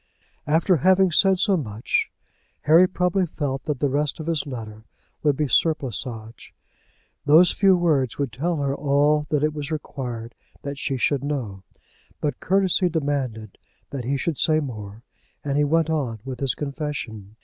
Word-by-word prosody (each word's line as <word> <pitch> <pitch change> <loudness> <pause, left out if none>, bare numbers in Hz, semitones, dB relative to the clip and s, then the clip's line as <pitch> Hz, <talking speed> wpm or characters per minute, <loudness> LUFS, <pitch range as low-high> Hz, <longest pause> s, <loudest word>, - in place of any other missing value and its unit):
After 165 +4 +3
having 185 +4 +4
said 190 +3 +4
so 200 +1 +3
much, 115 - -1 0.5
Harry 165 +4 +6
probably 180 0 0
felt 140 -4 -4
that 150 -4 -2
the 145 - +2
rest 145 +2 -1
of 155 - -5
his 160 -3 -1
letter 110 -4 -7 0.4
would 145 -3 +2
be 150 - 0
surplusage. 125 -7 -2 0.7
Those 160 +5 +7
few 195 -2 +4
words 145 -8 +1
would 140 -4 -2
tell 165 +9 -1
her 140 -2 -1
all 145 +1 +2
that 150 -1 +1
it 155 0 +1
was 150 -1 -5
required 125 -7 -5 0.3
that 140 0 -5
she 135 -1 -2
should 140 +2 0
know. 125 -10 -4 0.6
But 150 - -2
courtesy 190 -1 +2
demanded 135 - -3 0.3
that 135 -3 -4
he 140 +3 0
should 155 +2 -2
say 155 -1 +3
more, 110 -6 -7 0.4
and 140 -1 -2
he 150 - +3
went 160 +2 +1
on 135 -8 -1
with 130 -2 -6
his 135 -3 +1
confession. 140 -8 -5
145 Hz, 160 wpm, -23 LUFS, 130-160 Hz, 0.7 s, Those